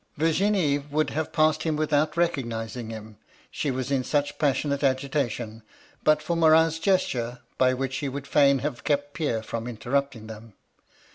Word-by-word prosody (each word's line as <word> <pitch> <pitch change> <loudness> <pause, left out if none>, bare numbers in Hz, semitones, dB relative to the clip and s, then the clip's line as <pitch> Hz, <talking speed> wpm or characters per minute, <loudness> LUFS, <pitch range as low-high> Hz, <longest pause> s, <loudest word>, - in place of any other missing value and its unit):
'Vlr^nie 160 -3 +1
would 155 +2 0
have 155 0 -2
passed 155 -1 +2
him 160 -2 0
without 150 0 +1
recognising 120 -8 -2
him, 110 -2 -9 0.3
she 145 - -2
was 130 0 -3
in 135 -2 +1
such 145 +2 -1
passionate 140 0 0
agitation, 130 -4 -1 0.4
but 155 0 +3
for 170 - -1
Morin's 160 0 +4
gesture, 125 -10 0 0.2
by 130 0 +5
which 130 0 -2
he 140 - -2
would 140 +1 -6
fain 140 -1 +4
have 145 -5 -4
kept 145 -1 0
Pierre 120 -9 -1
from 115 +1 -5
interrupting 120 +1 -2
them. 110 0 -10
140 Hz, 155 wpm, -26 LUFS, 120-155 Hz, 0.4 s, by